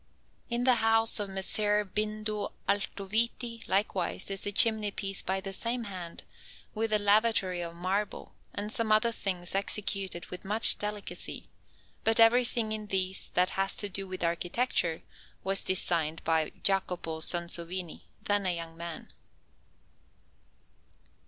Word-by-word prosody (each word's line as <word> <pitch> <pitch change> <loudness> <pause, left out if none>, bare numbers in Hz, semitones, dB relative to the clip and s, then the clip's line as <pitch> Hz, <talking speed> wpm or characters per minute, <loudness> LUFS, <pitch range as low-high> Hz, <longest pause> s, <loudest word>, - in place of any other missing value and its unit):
In 240 0 0
the 250 -1 +5
house 225 0 +5
of 205 -1 -1
Messer 205 +2 +2
Bindo 215 +1 -3
Altoviti, 225 +4 -1
likewise, 195 -1 0
is 195 +1 0
a - - -1
chimney 220 0 +3
piece 195 -1 +1
by 190 +1 -1
the 195 0 -4
same 235 +4 0
hand, 185 -5 -7 0.5
with 225 0 -1
a 215 - +4
lavatory 205 -3 +2
of 170 -1 -5
marble, 190 +4 -3 0.2
and 210 +1 -4
some 225 -1 -1
other 215 +2 +4
things 185 -5 -3
executed 195 -2 -2
with 180 - -7
much 210 +3 +3
delicacy; 210 -1 -4 0.5
but 225 +1 +3
everything 235 -1 +4
in 215 -1 -4
these 190 -1 0
that 180 +1 +3
has 195 0 +1
to 205 - 0
do 195 0 -5
with 185 -1 -5
architecture 170 0 0 0.4
was 195 0 0
designed 165 -4 +1
by 160 -1 +1
Jacopo 180 -4 -1
Sansovino, 170 +1 -1 0.2
then 205 -1 +1
a 180 - +1
young 165 -1 -6
man. 170 -1 -8
195 Hz, 135 wpm, -30 LUFS, 180-215 Hz, 0.5 s, the